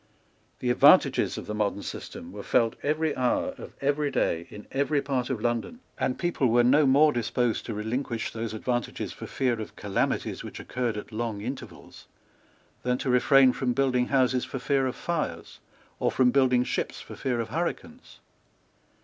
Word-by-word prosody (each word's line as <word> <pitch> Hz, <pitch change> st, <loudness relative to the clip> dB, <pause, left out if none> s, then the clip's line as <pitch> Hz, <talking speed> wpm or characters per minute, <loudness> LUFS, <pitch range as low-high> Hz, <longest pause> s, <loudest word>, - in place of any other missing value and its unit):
The 125 Hz, -, +1 dB
advantages -, -, +5 dB
of -, -, -6 dB
the 105 Hz, -, -4 dB
modern 105 Hz, -1 st, -1 dB
system 250 Hz, +3 st, -7 dB
were -, -, -7 dB
felt 115 Hz, -2 st, +2 dB
every 155 Hz, +1 st, 0 dB
hour 125 Hz, -1 st, 0 dB
of -, -, -9 dB
every 145 Hz, +1 st, +1 dB
day 85 Hz, -9 st, 0 dB
in 105 Hz, -, -10 dB
every 140 Hz, +2 st, +1 dB
part 135 Hz, -3 st, -2 dB
of 130 Hz, -5 st, -2 dB
London; 120 Hz, -, -2 dB, 0.2 s
and 125 Hz, -, -1 dB
people 175 Hz, -7 st, 0 dB
were 120 Hz, +1 st, +4 dB
no 140 Hz, +4 st, +5 dB
more 145 Hz, +3 st, +5 dB
disposed 120 Hz, 0 st, -1 dB
to 115 Hz, -, -4 dB
relinquish 115 Hz, +2 st, -3 dB
those 115 Hz, -1 st, -4 dB
advantages 120 Hz, +2 st, -3 dB
for -, -, -8 dB
fear 120 Hz, -4 st, -1 dB
of 110 Hz, -, -8 dB
calamities 100 Hz, -1 st, -1 dB
which -, -, -8 dB
occurred 120 Hz, -4 st, -2 dB
at 105 Hz, -, -7 dB
long 110 Hz, -2 st, -3 dB
intervals 130 Hz, +5 st, -8 dB, 0.7 s
than 125 Hz, 0 st, 0 dB
to 130 Hz, -, -1 dB
refrain 130 Hz, +1 st, +5 dB
from 125 Hz, -2 st, -1 dB
building 125 Hz, -2 st, +1 dB
houses 130 Hz, -2 st, +2 dB
for -, -, -5 dB
fear 135 Hz, +1 st, +1 dB
of 125 Hz, -, -3 dB
fires, 170 Hz, +1 st, -4 dB, 0.4 s
or -, -, +2 dB
from 125 Hz, -1 st, +3 dB
building 125 Hz, -2 st, +3 dB
ships -, -, -3 dB
for -, -, -10 dB
fear 125 Hz, -3 st, -2 dB
of 115 Hz, -1 st, -3 dB
hurricanes. 175 Hz, -, -5 dB
125 Hz, 175 wpm, -27 LUFS, 115-140 Hz, 0.7 s, advantages